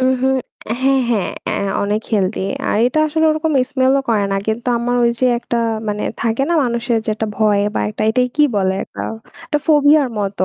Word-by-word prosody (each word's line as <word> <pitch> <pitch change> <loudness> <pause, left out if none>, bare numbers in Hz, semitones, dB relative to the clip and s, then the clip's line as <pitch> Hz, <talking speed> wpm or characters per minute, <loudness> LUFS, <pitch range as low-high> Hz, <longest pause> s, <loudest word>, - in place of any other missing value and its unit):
হুম, 260 0 +3
হুম। 265 0 +2 0.5
হ্যাঁ, 270 0 +3
হ্যাঁ। 210 -6 0 0.2
এ - - -1 0.3
অনেক 205 +1 0
healthy 200 -1 0 0.3
আর - - +1
এটা 255 +5 0
আসলে 320 +1 0
ওরকম 310 +1 0 0.2
smell 260 -1 +2
ও - - -8
করে 215 -3 +2
না। - - +1
কিন্তু 220 +2 -2
আমার 245 +1 -1
ওই 235 - +4
যে 255 - +4
একটা 235 0 -3 0.3
মানে 210 0 -2 0.2
থাকে 230 +3 0
না - - +2
মানুষের 235 -1 0
যে - - -9
একটা 220 +1 -3
ভয় 210 -1 +2
বা - - 0
একটা - - -5
এটাই 250 +2 +1
কি 300 - +4
বলে 190 -1 +1
একটা - - -8 0.4
একটা 300 -2 0
ফোবিয়ার 295 -2 +4
মতো। 200 -2 -1
235 Hz, 205 wpm, -18 LUFS, 210-270 Hz, 0.5 s, ওই